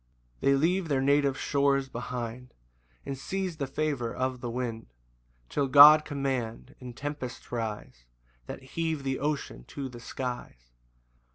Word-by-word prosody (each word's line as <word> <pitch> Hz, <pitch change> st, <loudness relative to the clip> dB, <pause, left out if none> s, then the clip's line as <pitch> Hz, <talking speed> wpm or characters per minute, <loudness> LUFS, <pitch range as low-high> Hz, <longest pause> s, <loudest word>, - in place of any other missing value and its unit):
2 -, -, 0 dB
They 140 Hz, -, +6 dB
leave 170 Hz, +5 st, +1 dB
their 140 Hz, -3 st, +1 dB
native 140 Hz, 0 st, +3 dB
shores 140 Hz, -1 st, +1 dB
behind, 125 Hz, 0 st, -6 dB, 0.5 s
And 140 Hz, -, -3 dB
seize 185 Hz, +5 st, -3 dB
the 140 Hz, -3 st, -2 dB
favour 135 Hz, -4 st, -1 dB
of 130 Hz, -1 st, -2 dB
the 120 Hz, -, -3 dB
wind, 120 Hz, -2 st, -4 dB, 0.6 s
Till 140 Hz, -, 0 dB
God 150 Hz, +3 st, +9 dB
command, 135 Hz, -3 st, -3 dB
and 125 Hz, -1 st, -9 dB
tempests 145 Hz, -3 st, -6 dB
rise 110 Hz, -, -5 dB, 0.4 s
That -, -, -7 dB
heave 160 Hz, +1 st, -2 dB
the 135 Hz, -1 st, -1 dB
ocean 145 Hz, -, -3 dB
to 140 Hz, -2 st, -6 dB
the 120 Hz, -1 st, -10 dB
skies. 120 Hz, -, -6 dB
135 Hz, 145 wpm, -29 LUFS, 125-145 Hz, 0.6 s, God